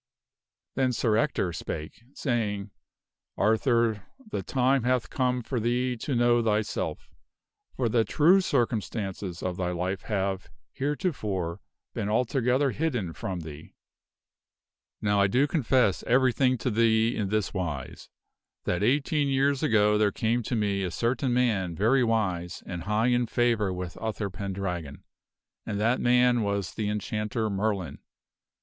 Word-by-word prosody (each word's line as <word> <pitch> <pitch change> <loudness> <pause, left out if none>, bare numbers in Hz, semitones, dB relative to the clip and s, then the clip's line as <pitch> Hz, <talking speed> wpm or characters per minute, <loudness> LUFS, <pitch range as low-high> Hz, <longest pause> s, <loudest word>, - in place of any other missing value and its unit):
Then 130 -1 +1
Sir 110 -2 +1
Ector 110 - 0
spake, 75 +4 -6
saying, 105 -6 -2 0.3
" - - -61
Arthur, 110 -2 +2 0.2
the - - -2
time 130 0 +2
hath 125 0 0
come 125 -1 0
for 125 +1 -2
thee 125 +2 0
to 130 +4 -3
know 120 0 +4
thyself, 105 -1 -2 0.6
for 125 - 0
the 115 0 +3
true 165 - +4
circumstances 105 - -2
of 90 -1 -2
thy 90 -1 -1
life 90 +2 -2
have, 95 -4 -2 0.2
heretofore, 105 - -2 0.3
been 100 - -2
altogether 125 +4 +1
hidden 125 - -2
from 95 -4 -4
thee. 80 -1 -10 1.3
"Now 105 -1 +3
I 100 - +5
do 125 +8 +3
confess 130 - +2
everything 130 +1 +3
to 125 - -2
thee 115 +1 +3
in 100 -3 -2
this 105 -3 -1
wise: 85 -9 -5 0.5
that 90 - -1
eighteen 140 +5 +2
year 135 +1 +3
ago 105 -6 +2
there 105 -1 +3
came 115 +2 0
to 120 - -3
me 100 -3 0
a 95 - -1
certain 120 - 0
man 110 -8 +1
very 120 +8 +3
wise 95 -7 -1
and 85 -1 -6
high 110 +4 +2
in 120 -1 +2
favor 115 -4 +1
with 90 -2 -6
Uther 105 -2 -3
Pendragon 95 -7 -5 0.6
and 100 - -3
that 115 +4 +2
man 125 0 +4
was 100 -3 -2
the 105 -2 -2
Enchanter 105 +2 -2
<th - - +1
Arthur*tk< 105 -2 -1
Merlin. 95 -7 -2
110 Hz, 145 wpm, -27 LUFS, 100-125 Hz, 1.3 s, I